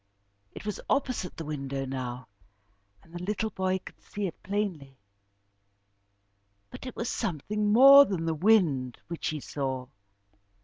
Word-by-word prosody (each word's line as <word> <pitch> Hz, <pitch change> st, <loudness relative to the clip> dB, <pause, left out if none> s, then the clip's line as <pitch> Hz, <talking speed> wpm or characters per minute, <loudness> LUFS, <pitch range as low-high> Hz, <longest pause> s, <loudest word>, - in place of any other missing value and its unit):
It -, -, -9 dB
was 210 Hz, -, -4 dB
opposite 255 Hz, -10 st, -1 dB
the 165 Hz, -, -5 dB
window 135 Hz, -2 st, -4 dB
now, 125 Hz, -2 st, -5 dB, 0.8 s
and 165 Hz, -, -21 dB
the 175 Hz, -, -6 dB
little 210 Hz, +3 st, -2 dB
boy 190 Hz, -1 st, 0 dB
could 185 Hz, -, -13 dB
see 205 Hz, -1 st, -5 dB
it 175 Hz, -, -6 dB
plainly, 185 Hz, -10 st, -3 dB, 1.7 s
but -, -, -9 dB
it 255 Hz, -, -7 dB
was 230 Hz, -, -3 dB
something 210 Hz, -, -1 dB
more 275 Hz, +5 st, +10 dB
than 180 Hz, -8 st, -3 dB
the 165 Hz, -, 0 dB
wind 155 Hz, -, +2 dB
which 170 Hz, -, -4 dB
he 155 Hz, -, -2 dB
saw. 130 Hz, -2 st, -4 dB
175 Hz, 140 wpm, -28 LUFS, 140-210 Hz, 1.7 s, more